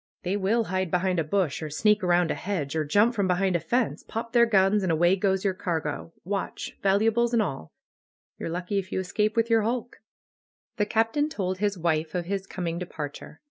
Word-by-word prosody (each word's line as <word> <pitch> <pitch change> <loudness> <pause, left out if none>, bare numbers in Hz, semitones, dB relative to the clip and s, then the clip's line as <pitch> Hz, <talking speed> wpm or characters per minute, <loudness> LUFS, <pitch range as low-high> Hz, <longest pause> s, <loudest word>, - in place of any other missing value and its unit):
^'They 185 +3 0
will 210 +4 +1
hide 185 -2 -2
behind 180 +1 +1
a - - +2
bush, 170 -1 0
or 155 - -4
sneak 210 +6 +2
around 175 -2 +3
a - - +1
hedge, 165 -7 -3
or 155 - +1
jump 205 +11 +3
from 200 -4 0
behind 185 0 +1
a - - +2
fence, 235 +9 0
pop 230 +1 -6
their 235 -1 +5
guns, 200 -1 +3
and 185 -3 0
away 175 +3 +4
goes 190 0 0
your 195 - +2
cargo, 165 -4 -3
watch 195 +2 -4
— - - -40
valuables, 225 +4 +2
and 230 - +4
all. 135 - -5 0.7
You're - - -4
lucky 180 +4 -2
if 190 - -5
3 - - -3
^ou - - +1
escape 210 +4 0
with 230 0 +1
your 225 -1 +5
hulk 240 +2 -2
V* - - -46 0.8
The 210 - +2
Captain 225 +8 +1
told 185 -8 -3
his 205 -1 0
wife 160 -1 -1
of 175 -1 -1
his 195 +1 -3
coming 170 -2 -3
departure. 150 -5 -7
190 Hz, 220 wpm, -26 LUFS, 175-210 Hz, 0.8 s, their